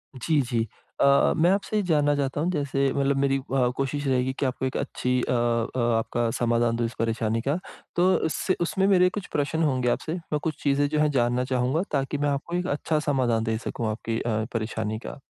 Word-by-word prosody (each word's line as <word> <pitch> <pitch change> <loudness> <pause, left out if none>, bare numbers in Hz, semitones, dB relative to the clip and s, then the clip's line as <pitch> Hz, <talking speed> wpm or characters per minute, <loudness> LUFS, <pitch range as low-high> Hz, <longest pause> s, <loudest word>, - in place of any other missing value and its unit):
जी, 145 +3 +1
जी। 115 -2 -1 0.3
अ, 140 0 +5
मैं 170 +3 +4
आपसे 205 +2 0
ये - - +3
जानना 145 -4 +2
चाहता 140 +1 -1
हूँ 175 - +1
जैसे 140 -3 0
मतलब 140 0 +1
मेरी 135 0 +2
व 125 -2 +2
कोशिश 140 +1 -2
रहेगी 130 0 +1
कि 140 - +1
आपको 130 0 -2
एक 130 - -2
अच्छी 125 0 -1
अ - - -2
अ, 120 0 0 0.2
आपका 115 +1 -1
समाधान 120 -1 +2
दूँ 120 0 0
इस 115 - -4
परेशानी 115 0 0
का 140 +7 0 0.4
तो 180 +2 +4 0.2
उससे 175 +4 0
उसमें 190 +3 +1
मेरे 180 -2 +5
कुछ 200 0 -6
प्रश्न 150 +3 0
होंगे 130 -4 +1
आपसे, 155 +6 -1
मैं 165 -4 -3
कुछ 160 - -3
चीज़ें 145 0 +2
जो 150 0 0
है 150 0 +3
जानना 125 -1 +1
चाहूँगा 130 +5 0
ताकि 140 0 -1
मैं 145 0 +1
आपको 145 +5 -2
एक 180 +1 -1
अच्छा 150 +2 0
समाधान 120 -5 +2
दे 110 -1 -1
सकूँ 115 -1 -4
आपकी 115 +1 -3
अ, 110 -2 -1
परेशानी 110 -1 -2
का। 135 - -8
135 Hz, 210 wpm, -25 LUFS, 120-150 Hz, 0.4 s, अ